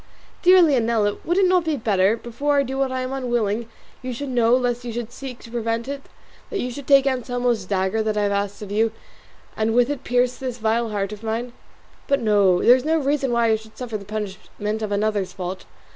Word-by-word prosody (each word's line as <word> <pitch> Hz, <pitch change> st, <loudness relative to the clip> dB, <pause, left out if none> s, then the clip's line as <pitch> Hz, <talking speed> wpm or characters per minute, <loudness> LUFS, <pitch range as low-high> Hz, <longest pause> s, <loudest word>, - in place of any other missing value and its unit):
dear 365 Hz, 0 st, +7 dB
Leonela, 230 Hz, -8 st, +2 dB
would 345 Hz, +2 st, 0 dB
it 390 Hz, -, +5 dB
not 365 Hz, -1 st, +3 dB
be 315 Hz, -3 st, -1 dB
better, 205 Hz, -2 st, +2 dB
before 280 Hz, +6 st, -1 dB
I 280 Hz, -, +4 dB
do 265 Hz, 0 st, -5 dB
what 270 Hz, -1 st, +1 dB
I 260 Hz, 0 st, -2 dB
am 255 Hz, +1 st, -3 dB
unwilling 235 Hz, -4 st, -1 dB, 0.3 s
you 255 Hz, -1 st, -4 dB
should 285 Hz, +3 st, -5 dB
know 240 Hz, -1 st, +3 dB
lest 245 Hz, -1 st, -1 dB
you 240 Hz, -, -5 dB
should 235 Hz, 0 st, -5 dB
seek 255 Hz, -1 st, -8 dB
to 230 Hz, -, -12 dB
prevent 230 Hz, 0 st, -2 dB
it, 280 Hz, 0 st, -4 dB, 0.5 s
that 410 Hz, -, -3 dB
you 250 Hz, -, -2 dB
should 275 Hz, +2 st, -8 dB
take 275 Hz, -1 st, +6 dB
Anselmo's 245 Hz, -4 st, 0 dB
dagger 190 Hz, +3 st, 0 dB
that 215 Hz, -1 st, -1 dB
I 210 Hz, -, +2 dB
have 200 Hz, -, +1 dB
asked 200 Hz, +1 st, -2 dB
of 200 Hz, -, -8 dB
you 220 Hz, +2 st, +2 dB, 0.6 s
and 220 Hz, +1 st, 0 dB
with 245 Hz, +3 st, +4 dB
it 290 Hz, -, -5 dB
pierce 250 Hz, 0 st, +1 dB
this 255 Hz, -3 st, -4 dB
vile 225 Hz, +1 st, 0 dB
heart 200 Hz, -1 st, -2 dB
of 210 Hz, -, -10 dB
mine? 230 Hz, +2 st, -3 dB, 0.5 s
But 280 Hz, -1 st, +2 dB
no; 200 Hz, -5 st, +3 dB
there 245 Hz, -, +8 dB
is 255 Hz, -, -2 dB
no 320 Hz, +2 st, +2 dB
reason 280 Hz, -3 st, 0 dB
why 235 Hz, -1 st, +2 dB
I -, -, +4 dB
should 220 Hz, 0 st, -16 dB
suffer 245 Hz, -3 st, -5 dB
the 200 Hz, -, -11 dB
punishment 210 Hz, +1 st, -5 dB
of 215 Hz, -1 st, -3 dB
another's 205 Hz, -2 st, 0 dB
fault. 185 Hz, 0 st, -5 dB
235 Hz, 225 wpm, -22 LUFS, 215-260 Hz, 0.6 s, there